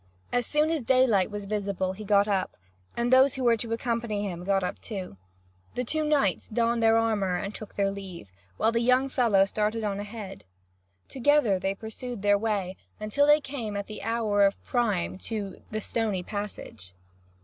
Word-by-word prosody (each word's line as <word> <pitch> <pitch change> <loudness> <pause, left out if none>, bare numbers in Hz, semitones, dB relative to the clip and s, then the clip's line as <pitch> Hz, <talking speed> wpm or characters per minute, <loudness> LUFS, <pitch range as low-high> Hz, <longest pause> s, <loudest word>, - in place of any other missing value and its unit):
As 245 -1 +1
soon 300 +1 +2
as 320 -3 0
daylight 230 -7 +3
was 205 -1 -6
visible 195 -2 -2
he 210 +3 -8
got 200 0 +3
up, 195 -3 -1 0.4
and 240 +1 +1
those 260 +1 +6
who 265 - -3
were 235 -1 +5
to 230 +1 -5
accompany 230 -2 -1
him 175 -2 -6
got 195 0 +1
up 180 - -4
too. 190 - -6 0.6
The 250 - -1
two 310 +6 -1
knights 290 - +1
donned 230 +1 +1
their 225 0 +5
armour 210 -5 +1
and 195 +3 -3
took 215 - -9
their 200 -1 +1
leave, 185 - -9 0.3
while 225 - +2
the 230 - +1
young 255 +3 +3
fellow 225 -7 +3
started 215 +2 -1
on 200 -1 -2
ahead. 205 -2 -7 0.6
Together 265 -7 +2
they 195 +1 -1
pursued 225 +1 -7
their 205 0 +4
way 200 -4 -2 0.2
until 215 +7 +1
they 295 +1 +6
came 240 -7 -5
at 200 - -3
the 215 - -8
hour 215 -2 +1
of 195 0 +2
prime 210 -7 0
to 205 -3 -5
"the 215 - -3
stony 215 -4 -1
passage." 175 - -7
215 Hz, 180 wpm, -27 LUFS, 195-235 Hz, 0.6 s, those